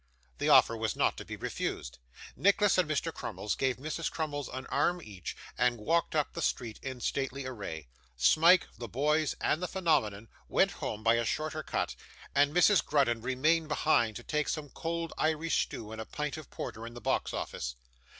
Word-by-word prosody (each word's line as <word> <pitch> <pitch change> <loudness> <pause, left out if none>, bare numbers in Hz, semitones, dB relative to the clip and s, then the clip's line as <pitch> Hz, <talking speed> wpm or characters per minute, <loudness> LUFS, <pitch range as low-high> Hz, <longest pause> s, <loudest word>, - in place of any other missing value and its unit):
The - - +1
offer 115 - +7
was 110 -1 -1
not - - +2
to - - -7
be - - -6
refused; 60 0 -4 0.4
Nicholas 200 0 +4
and 175 -4 +2
Mr. 155 - -1
Crummles 105 - -3
gave 130 -2 0
Mrs 155 +4 -3
Crummles 145 -3 -3
an 130 - -6
arm 175 +1 +1
each, 100 - -8 0.2
and 125 -1 +3
walked 165 +10 +1
up 150 -2 +1
the 170 - -4
street 115 -7 -2
in 130 -2 -6
stately 135 +1 -2
array. 95 - -6 0.3
Smike, 165 - +6
the 120 - -5
boys, 150 +6 +1
and 155 - +1
the 180 - -1
phenomenon, 115 - 0 0.2
went - - +3
home 110 0 -5
by 115 +1 +5
a 120 - +1
shorter 155 +6 -2
cut, - - -2 0.4
and 145 +1 +4
Mrs 180 +4 +5
Grudden 125 -6 +2
remained 155 +7 +2
behind 120 -7 +2
to 120 - -7
take 150 +2 -1
some 150 -2 -3
cold 165 +3 -3
Irish 160 +1 +1
stew 110 -1 -8
and 110 0 -5
a - - -6
pint 150 +3 -3
of 155 -3 -9
porter 115 +1 -6
in 120 - -10
the - - -7
box - - 0
office. - - -4
140 Hz, 190 wpm, -31 LUFS, 115-160 Hz, 0.4 s, offer